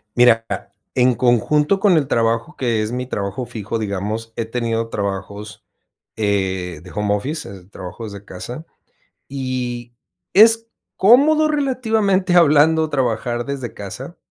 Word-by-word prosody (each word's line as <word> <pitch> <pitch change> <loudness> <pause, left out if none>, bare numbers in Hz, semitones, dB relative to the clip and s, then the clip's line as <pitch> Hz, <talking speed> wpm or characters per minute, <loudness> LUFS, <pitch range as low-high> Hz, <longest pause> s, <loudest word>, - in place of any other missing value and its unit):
Mira, 120 -2 +5
ah, - - -4 0.3
en 125 -1 +3
conjunto 150 - +2
con 195 -1 +4
el 155 -5 +2
trabajo, 115 -2 0
que 115 -4 0
es 110 +1 -3
mi 125 +1 -3
trabajo 100 0 -4
fijo, 115 -1 -5
digamos, 105 +2 -4
he 115 - -2
tenido 115 -1 -2
trabajos, 100 +1 -5 0.5
eh, 95 -5 -1
de 90 - -12
home 105 -1 0
office, 140 +8 -4
es, 95 -1 -13
trabajo 95 +5 -8
desde 100 -2 -8
casa, 120 - -8 0.6
y 125 -3 -4 0.4
es 225 +3 +6 0.3
cómodo 295 +9 +5
relativamente 225 -10 +1
hablando 160 -1 +5
trabajar 120 -3 -1
desde 135 -4 -5
casa. 130 - -8
120 Hz, 135 wpm, -20 LUFS, 105-155 Hz, 0.6 s, es